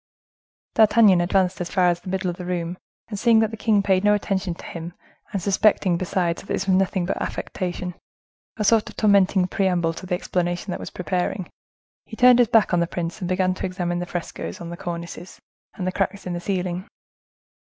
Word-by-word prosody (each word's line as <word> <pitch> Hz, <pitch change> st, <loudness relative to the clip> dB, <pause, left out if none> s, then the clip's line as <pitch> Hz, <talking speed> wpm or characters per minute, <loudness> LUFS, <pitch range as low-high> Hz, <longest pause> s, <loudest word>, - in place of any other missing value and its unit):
D'Artagnan 215 Hz, -4 st, +5 dB
advanced 180 Hz, 0 st, +1 dB
as 175 Hz, -, -3 dB
far 185 Hz, -2 st, +3 dB
as 175 Hz, 0 st, 0 dB
the 185 Hz, -, -9 dB
middle 185 Hz, -1 st, -1 dB
of 175 Hz, -, -10 dB
the 180 Hz, -, -7 dB
room, 175 Hz, 0 st, -3 dB, 0.3 s
and 205 Hz, -3 st, -4 dB
seeing 235 Hz, 0 st, +5 dB
that 220 Hz, -1 st, +3 dB
the -, -, -5 dB
king 210 Hz, -2 st, +2 dB
paid 190 Hz, -1 st, +2 dB
no 210 Hz, 0 st, +5 dB
attention 195 Hz, -3 st, -2 dB
to -, -, -12 dB
him, 170 Hz, +1 st, -7 dB, 0.4 s
and 200 Hz, -, -1 dB
suspecting, 195 Hz, -1 st, +2 dB
besides, 175 Hz, -1 st, -1 dB
that -, -, -17 dB
this 190 Hz, -, -1 dB
was 190 Hz, -, +3 dB
nothing 190 Hz, -1 st, +1 dB
but 185 Hz, -, -2 dB
affectation, 180 Hz, 0 st, -4 dB, 0.6 s
a 215 Hz, -, -1 dB
sort 215 Hz, +1 st, +3 dB
of -, -, -12 dB
tormenting 200 Hz, -3 st, +4 dB
preamble 180 Hz, -3 st, +1 dB
to 185 Hz, -, -9 dB
the 180 Hz, -, 0 dB
explanation 175 Hz, +1 st, -2 dB
that -, -, -4 dB
was -, -, -6 dB
preparing, 180 Hz, +1 st, -3 dB, 0.5 s
he 220 Hz, -, -9 dB
turned 250 Hz, +1 st, +6 dB
his 240 Hz, -, +5 dB
back 220 Hz, -4 st, +3 dB
on 175 Hz, -, +4 dB
the 170 Hz, -, +1 dB
prince, 175 Hz, +3 st, -4 dB
and 180 Hz, -3 st, -4 dB
began 185 Hz, 0 st, +1 dB
to -, -, -8 dB
examine 175 Hz, -1 st, -2 dB
the 175 Hz, -, -4 dB
frescoes 175 Hz, -1 st, -5 dB
on 170 Hz, 0 st, -7 dB
the -, -, -5 dB
cornices, 170 Hz, +1 st, -7 dB, 0.4 s
and 185 Hz, -, -4 dB
the 185 Hz, -, 0 dB
cracks 195 Hz, +1 st, -2 dB
in 180 Hz, -, -3 dB
the 175 Hz, -, -3 dB
ceiling. 180 Hz, 0 st, -3 dB
185 Hz, 210 wpm, -23 LUFS, 175-200 Hz, 0.6 s, turned